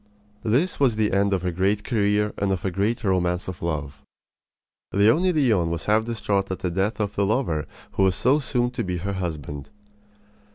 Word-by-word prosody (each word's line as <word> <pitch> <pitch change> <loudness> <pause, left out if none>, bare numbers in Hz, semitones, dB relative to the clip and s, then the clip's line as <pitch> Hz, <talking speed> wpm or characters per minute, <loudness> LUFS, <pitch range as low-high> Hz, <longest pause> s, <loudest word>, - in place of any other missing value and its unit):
This 135 +12 +1
was 130 -6 +3
the 110 -1 +1
end 100 +1 +2
of 95 -2 0
a 90 - +1
great 100 +4 0
career 105 -2 +1
and 100 -1 +1
of 95 -1 -2
a 95 - 0
great 105 +6 -1
romance 90 -2 0
of 95 -2 -6
love. 75 -4 -3 0.9
Leonie 115 - +4
Leon 115 - +2
was 85 -1 -3
half 110 +1 +2
distraught 105 -4 -1
at 95 - -2
the 90 - -3
death 95 +6 -1
of 105 -1 -1
the 100 - +1
lover 100 - 0 0.2
who - - -2
was 95 -1 +3
so 135 +5 +3
soon 125 -3 0
to 125 -1 -3
be 90 -1 -2
her 100 +4 -3
husband. 75 -6 -5
100 Hz, 195 wpm, -24 LUFS, 90-110 Hz, 0.9 s, Leonie